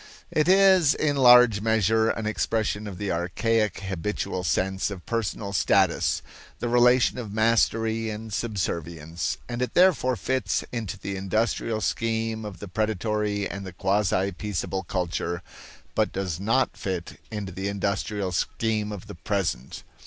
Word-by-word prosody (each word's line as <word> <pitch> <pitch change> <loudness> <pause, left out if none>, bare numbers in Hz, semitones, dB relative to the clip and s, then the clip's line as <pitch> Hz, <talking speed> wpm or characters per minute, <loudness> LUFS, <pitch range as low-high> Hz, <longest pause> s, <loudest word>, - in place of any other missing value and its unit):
It 155 +1 +2
is 190 -5 +6
in 145 -2 +1
large 125 -5 +7
measure 110 0 +2
an 110 - -2
expression 110 -1 -1
of 95 -3 -7
the 100 0 -2
archaic 105 +5 0
habitual 95 0 -3
sense 95 +6 0
of 95 -4 -8
personal 110 -3 -2
status 95 - +2 0.3
the 120 - -3
relation 125 +1 +4
of 110 -4 -6
mastery 115 0 +2
and 110 0 -6
subservience 85 -7 -3
and 120 0 -4
it 125 -2 -2
therefore 175 -9 +4
fits 115 0 -1
into 110 -4 -4
the 100 +1 -5
industrial 110 +3 -1
scheme 110 -1 -1
of 100 -3 -7
the 100 - -8
predatory 105 +1 -1
and 100 - -6
the 95 -2 -8
quasi 95 0 +1
peaceable 95 0 -3
culture, 90 -1 -3 0.5
but - - +1
does 95 -4 -3
not 115 +7 +1
fit 90 -3 -5
into 105 -3 -5
the 95 +2 -4
industrial 100 0 -2
scheme 105 +3 -1
of 100 -3 -7
the - - -9
present. 85 - -3
105 Hz, 145 wpm, -26 LUFS, 95-115 Hz, 0.5 s, large